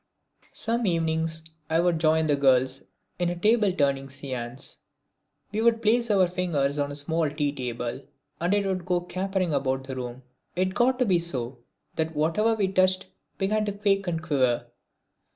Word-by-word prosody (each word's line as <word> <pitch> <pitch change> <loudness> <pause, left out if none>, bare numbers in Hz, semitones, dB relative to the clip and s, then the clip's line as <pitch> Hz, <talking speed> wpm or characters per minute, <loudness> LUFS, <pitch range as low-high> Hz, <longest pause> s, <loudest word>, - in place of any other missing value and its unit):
Some 230 0 0
evenings 160 -1 0 0.3
I 160 +1 +2
would 170 -1 +2
join 160 0 +3
the 150 -2 +3
girls 130 -1 +3 0.4
in 175 -1 +1
a 175 - -2
table 210 +1 +3
turning 140 -5 0
seance. 130 -2 -4 0.7
We 215 +1 -1
would 230 0 +4
place 235 +2 +3
our 195 -3 +4
fingers 155 -6 0
on 145 0 0
a - - -5
small 160 +2 0
tea 145 -1 -1
table 120 -1 -4 0.4
and 175 +2 0
it 205 -1 +1
would 190 -2 -1
go 180 0 0
capering 185 -1 -1
about 135 -1 0
the 135 0 -6
room. 125 0 -6 0.3
It 185 +1 0
got 250 +4 +3
to 255 - +2
be 185 -5 +3
so 130 -7 -3 0.4
that 160 0 -1
whatever 190 +10 +2
we 205 -3 +1
touched 185 0 +3 0.3
began 210 +2 +1
to 205 - -2
quake 195 -1 +1
and 165 -2 -2
quiver. 130 -6 +1
165 Hz, 170 wpm, -26 LUFS, 140-195 Hz, 0.7 s, would